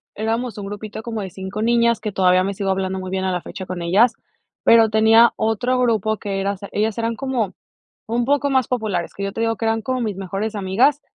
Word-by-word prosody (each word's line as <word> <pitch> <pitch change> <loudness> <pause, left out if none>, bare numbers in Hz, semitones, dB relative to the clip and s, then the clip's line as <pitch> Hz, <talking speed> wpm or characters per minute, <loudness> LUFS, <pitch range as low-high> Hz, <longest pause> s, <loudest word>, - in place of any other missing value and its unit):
éramos 225 +2 -2
un 205 - -5
grupito 205 +2 -7
como 225 -2 -4
de 190 - -5
5 190 +3 -6
niñas, 235 0 +3
que 215 -1 -4
todavía 185 -1 +3
me 200 +1 -2
sigo 195 0 -1
hablando 190 0 -1
muy 185 0 -6
bien 190 0 -1
a 190 - 0
la 180 -1 -2
fecha 190 -1 -8
con 180 -2 -5
ellas, 210 +8 +4 0.5
pero 225 -1 +6
tenía 220 +2 +6
otro 225 +4 0
grupo 220 -3 +1
que 195 -1 -3
eras 200 0 -2
ellas 215 +1 -1
eran 230 0 -1
como 245 -7 -2 0.5
un 235 +2 0
poco 285 +1 +1
más 260 -2 +2
populares, 215 -8 -2
que 200 - -6
yo 195 - -2
te - - -6
digo 225 0 +1
que - - -6
eran 225 0 +1
como 255 +3 -2
mis 210 -5 -2
mejores 195 +3 -4
amigas, 230 +9 +2
215 Hz, 225 wpm, -21 LUFS, 195-230 Hz, 0.5 s, pero